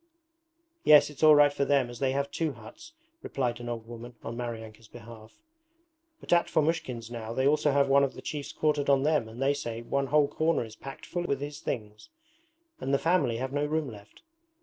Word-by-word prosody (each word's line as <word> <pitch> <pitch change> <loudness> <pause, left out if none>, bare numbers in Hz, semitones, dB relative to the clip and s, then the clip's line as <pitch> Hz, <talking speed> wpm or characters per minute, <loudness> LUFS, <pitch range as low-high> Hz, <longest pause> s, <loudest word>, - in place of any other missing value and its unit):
'Yes, 150 0 +6
it's 145 - -13
all 155 -1 +8
right 145 -1 +5
for 140 - 0
them 140 -3 +2
as 120 0 -10
they 135 -1 +1
have 140 +1 -2
two 160 -3 -1
huts,' 325 - -13 0.3
replied 120 -3 -2
an 120 0 -6
old 115 -2 -5
woman 120 +1 -9
on 115 - -5
Maryanka's 115 -2 -7
behalf, 110 -1 -13 0.8
'but - - -1
at 170 - +3
Fomushkin's 130 -7 -1
now 115 -1 -5
they 130 +2 0
also 150 +1 +3
have 140 0 +3
one 140 +1 +5
of 135 - -1
the - - -9
chiefs 145 -2 -5
quartered 150 -2 0
on 135 -1 +4
them 150 -6 +1
and 115 +2 -11
they 135 +1 +2
say 115 -5 -5
one 140 +3 -1
whole 150 +1 +3
corner 155 -3 0
is 110 -1 -12
packed 135 +4 -10
full 175 -1 -3
with 140 -5 -1
his 145 +1 -6
things, 105 -5 -6 0.7
and 135 - -3
the 140 - +4
family 165 -8 +1
have 130 +2 -4
no 145 0 0
room 155 0 -1
left. 105 - -15
135 Hz, 210 wpm, -28 LUFS, 115-150 Hz, 0.8 s, all